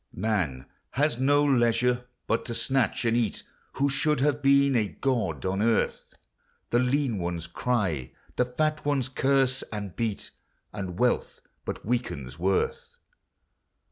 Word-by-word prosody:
Man 90 -11 -1 0.3
has 140 -2 +1
no 145 +2 +4
leisure 125 -2 +2 0.2
but 115 - 0
to 115 - -3
snatch 130 -2 0
and 115 0 +3
eat, 115 -4 0 0.3
Who 140 +1 +1
should 150 +2 +1
have 145 +1 +1
been 140 -1 +4
a 110 -3 +2
god 105 - -1
on 95 +2 0
earth; 115 0 0 0.6
The 120 - +4
lean 125 -3 +1
ones 85 -1 -3
cry; 90 - -1 0.2
the 125 - +2
fat 155 +5 -1
ones 140 -3 +1
curse 135 0 +2
and 100 -4 -5
beat, 115 -4 -3 0.4
And 90 -3 -5
wealth 125 +1 0 0.2
but - - -5
weakens 80 - -3
worth. 95 +2 -1
120 Hz, 140 wpm, -27 LUFS, 100-135 Hz, 0.6 s, no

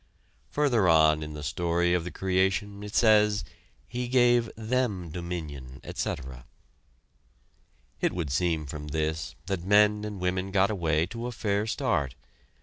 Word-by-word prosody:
Further 120 -11 +2
on 80 -1 +5
in 75 0 -6
the 75 - -7
story 85 +4 +1
of 90 -2 +1
the 90 - -5
creation 95 +2 0
it 105 0 -7
says: 105 -2 +4 0.4
"He 125 0 -3
gave 120 -2 +4
them 110 -7 -1
dominion, 75 -7 -6
etc." 65 -1 -5 1.6
It - - +2
would 85 -6 -3
seem 80 +1 0
from 75 +1 -7
this, 80 +2 -2
that 95 -2 -3
men 105 +2 +4
and 105 -2 -5
women 90 +1 -1
got 100 +1 +2
away 80 -5 +1
to 115 +5 -6
a - - -4
fair 105 -2 -1
start. 85 - -1
90 Hz, 145 wpm, -28 LUFS, 80-105 Hz, 1.6 s, on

